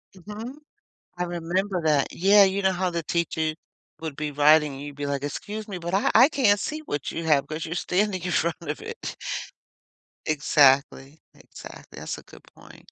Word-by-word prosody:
Mhm. 210 +7 -8 0.6
I 180 - 0
remember 175 +2 -2
that. 150 -3 +3
Yeah, 200 +3 +6
you 195 +1 0
know 190 0 +3
how 185 0 -1
the 170 -1 -3
teacher 160 -1 -1 0.5
would 160 -3 -5
be 150 -1 -3
writing 150 +1 +4
and 135 - -8
you'd 145 -1 -8
be 145 0 -3
like, 140 -1 -2
"Excuse 210 +9 -5
me, 195 - -5
but 170 0 -5
I 195 - +2
I 250 +5 +8
can't 220 -9 +3
see 305 +9 -4
what 145 - -4
you 165 - -5
have, 145 -3 +3
'cause 155 +2 -5
you're 165 - -4
standing 185 +1 0
in 180 - -3
front 170 0 +1
of - - -4
it." 455 +2 -7 1.1
Exactly. 145 -1 +3
Exactly, - - -12
that's - - -5
a - - -12
good - - -16
point. - - -17
170 Hz, 185 wpm, -25 LUFS, 150-200 Hz, 1.1 s, I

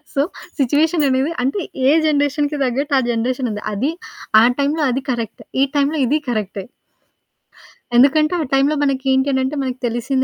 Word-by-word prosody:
So, 275 - +3 0.4
situation 295 +4 +2
అనేది 265 +5 +1
అంటే 275 +10 -1 0.3
ఏ - - +6 0.2
జనరేషన్‌కి 290 0 0
తగ్గట్టు 275 +4 -2
ఆ! - - +1
జనరేషన్ 250 +2 -1
ఉంది. 210 - -5
అది 260 +10 -1 0.5
ఆ! - - +5 0.2
టైంలో 295 +3 0
అది 265 +2 -1
కరెక్ట్ 230 -3 -5 0.2
ఈ - - +5
టైంలో 285 +3 +1
ఇదీ 290 +5 +2
కరెక్టె. 210 -4 -3 1.3
ఎందుకంటే 305 +6 +4
ఆ! - - 0
టైంలో, 275 +3 +3
మనకేంటి 265 0 +1
అనంటే 265 +2 -1
మనకి 255 -1 -4
తెలిసిన 250 +3 -1
270 Hz, 150 wpm, -19 LUFS, 250-290 Hz, 1.3 s, ఏ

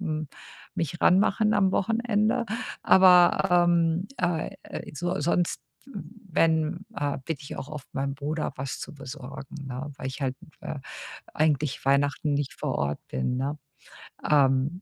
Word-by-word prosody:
hm, 155 -5 -3 0.5
mich 165 +1 -2
ranmachen 205 +3 +4
am 195 -2 +3
Wochenende. 225 +1 +1 0.4
Aber, 180 -1 +6
ähm, 170 +1 +2
äh, 175 -3 -1 0.4
so 175 +4 -2
sonst, 170 +2 +1 0.3
wenn 180 - -1
äh, 145 -6 -1
bitte 160 0 -4
ich 140 - -7
auch - - -5
oft 150 -3 -8
meinen 140 0 -1
Bruder 150 +3 -3
was 135 0 -4
zu - - -7
besorgen, 135 +1 -8
ne, 135 +3 -5
weil 135 - -6
ich 135 +2 -6
halt, 130 -1 -1 0.2
äh, 145 - -5 0.6
eigentlich 150 -3 +1
Weihnachten 140 +2 +2
nicht 140 -1 -2
vor - - -2
Ort 70 +1 -1
bin, 65 - -1
ne? 140 +3 -2 0.7
Ähm, 140 +4 +3
155 Hz, 140 wpm, -27 LUFS, 140-180 Hz, 0.7 s, Aber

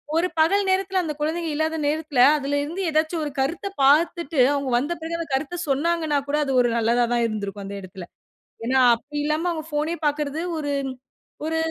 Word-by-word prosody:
ஒரு 335 +2 +2
பகல் 390 +6 +3
நேரத்துல 380 0 +1
அந்த 310 -2 -3
குழந்தைங்க 325 +2 -1
இல்லாத 315 +1 0
நேரத்துல 300 -3 0 0.2
அதில 285 0 -1
இருந்து 335 +6 -4
ஏதாச்சும் 315 +2 0
ஒரு 295 - -4
கருத்தப் 345 +9 -2
பாத்துட்டு 320 +2 +3
அவுங்க 280 -2 -2
வந்த 285 +7 -1
பிறகு 330 +1 -3
அந்த 335 - -5
கருத்த 310 +6 -2
சொன்னாங்கன்னாகூட, 295 -1 0
அது 270 - -1
ஒரு 240 -1 +1
நல்லதா 235 +1 +2
தான் 235 -1 +2
இருந்திருக்கும் 205 -2 -5
அந்த 200 +1 -6
எடத்துல. 185 -1 -9 0.6
ஏன்னா, 260 +2 +2 0.2
அப்பிடி 290 +5 -6
இல்லாம 305 +3 0
அவுங்க 315 -2 -5
ஃபோனே 305 +3 -1
பாக்கிறது 295 +1 -2 0.2
ஒரு 290 -1 -2 0.7
ஒரு 320 +1 -1
300 Hz, 175 wpm, -23 LUFS, 270-330 Hz, 0.7 s, பகல்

